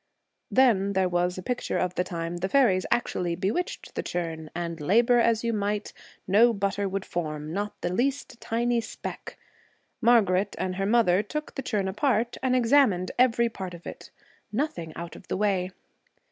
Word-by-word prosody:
Then 205 -7 +3
there 190 -1 +2
was 180 0 0
a 185 - -6
picture 245 +4 -2
of 180 -1 0
the 180 - 0
time 170 -1 -4
the 190 +2 -2
fairies 210 -9 +3
actually 175 -7 0
bewitched 215 - -3
the - - -2
churn, 165 -3 -4
and, 170 -1 -4
labor 235 - +4
as 230 -1 +2
you 230 0 0
might, 210 0 -2 0.3
no 225 +5 +5
butter 200 -1 -1
would 195 0 -3
form, 155 -2 -4
not 205 +2 -3
the 175 - -2
least 260 +2 -1
tiny 235 +1 0
speck. 225 - -8 0.6
Margaret 205 -5 +3
and 185 0 -2
her 195 0 0
mother 205 -5 +4
took 300 +8 -5
the 270 - -4
churn 205 -6 -1
apart 230 +3 0
and 255 -1 +2
examined 235 -7 +3
every 235 -2 +4
part 190 -5 -6
of 170 - -14
it. - - -9 0.4
Nothing 210 - -2
out 170 0 -7
of 185 - -14
the - - -2
way. 195 -3 +1
200 Hz, 175 wpm, -27 LUFS, 180-235 Hz, 0.6 s, no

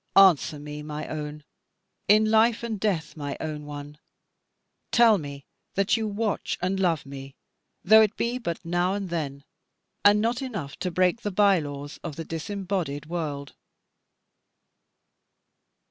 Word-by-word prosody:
Answer 175 -5 +6
me, 150 0 -7
my 150 0 -5
own, 150 -1 -5 0.6
in 215 +2 +6
life 225 +1 +4
and 225 -3 -3
death 185 -7 -1
my 145 -2 -4
own 150 -1 -5
one; 145 0 -8 0.9
tell 230 -4 +6
me 140 -2 -8 0.3
that 195 +1 +3
you 225 -2 -1
watch 210 0 -2
and 185 +2 -1
love 170 -6 +1
me, 135 0 -9 0.5
though 220 +3 +8
it 215 -1 +2
be 240 +2 -1
but 170 -7 -4
now 175 +3 +1
and 195 -3 -4
then, 140 -4 -3 0.6
and 205 +1 +6
not 230 +4 0
enough 200 - -5
to 180 - -2
break 180 +5 +2
the 205 - -2
by 200 -1 +4
laws 145 -1 -7
of 165 -4 -5
the 165 - -6
disembodied 175 -3 -3
world. 150 -4 -4
175 Hz, 145 wpm, -26 LUFS, 150-205 Hz, 0.9 s, though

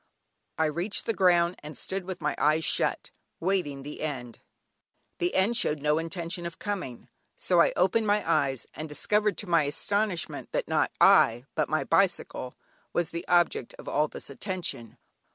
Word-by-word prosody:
I 160 - +2
reached 170 +7 -1
the 225 - 0
ground, 175 -2 +3
and 150 +1 -9
stood 190 -1 -4
with 185 -1 -6
my - - 0
eyes 155 +1 +2
shut - - 0 0.3
waiting 165 -7 -1
the 145 +1 -8
end. 130 -6 -5 0.8
The 175 +1 0
end 205 +5 +3
showed 150 -8 +1
no 150 +2 +2
intention 170 +1 -4
of 170 - -9
coming, 185 - -5 0.3
so 175 -2 +3
I - - +4
opened 215 +5 +2
my 205 -2 +1
eyes, 140 -7 +1
and 155 0 -6
discovered 210 +6 +1
to 205 - -4
my 170 -3 +3
astonishment 195 +5 -2
that - - -1
not - - +1
I 120 +3 +5
but 155 - 0
my 155 - +1
bicycle 165 -8 0 0.4
was 175 0 0
the 170 - -5
object 175 -8 +2
of - - -12
all 150 +1 +1
this 140 - -9
attention. 155 - -4
170 Hz, 170 wpm, -28 LUFS, 150-190 Hz, 0.8 s, I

